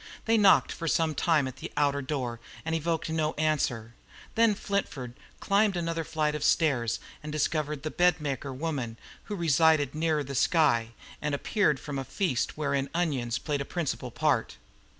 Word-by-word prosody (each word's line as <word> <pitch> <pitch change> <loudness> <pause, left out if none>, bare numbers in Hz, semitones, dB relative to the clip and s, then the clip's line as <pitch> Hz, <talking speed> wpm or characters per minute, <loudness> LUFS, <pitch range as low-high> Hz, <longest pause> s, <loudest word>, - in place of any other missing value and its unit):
They 225 - +3
knocked 200 -3 +5
for 165 - -5
some 160 0 +2
time 150 -2 +2
at 130 0 -8
the - - -7
outer 140 -1 +2
door 130 -4 -3 0.3
and 160 - -1
evoked 165 0 -1
no 155 -1 0
answer; 135 -7 -1 0.4
then 225 -2 +4
Flintford 170 - -3 0.3
climbed 200 -1 +2
another 165 -1 -1
flight 155 -2 -1
of 150 -1 -3
stairs 130 -9 +2 0.2
and 150 - -6
discovered 150 -1 -1
the 155 - -3
bedmaker 150 -6 +1
woman, 130 -5 -3 0.3
who 210 - -4
resided 160 -4 +3
nearer 155 -1 0
the 140 0 -6
sky, 125 -7 +2 0.3
and 150 -1 0
appeared 150 - +1
from 145 -1 -5
a - - -3
feast 155 - -1
wherein 140 -2 -1
onions 135 -9 0
had - - -11
played 145 -2 -1
a - - 0
principal 145 -7 -3
part. 125 - 0
150 Hz, 170 wpm, -28 LUFS, 135-165 Hz, 0.4 s, knocked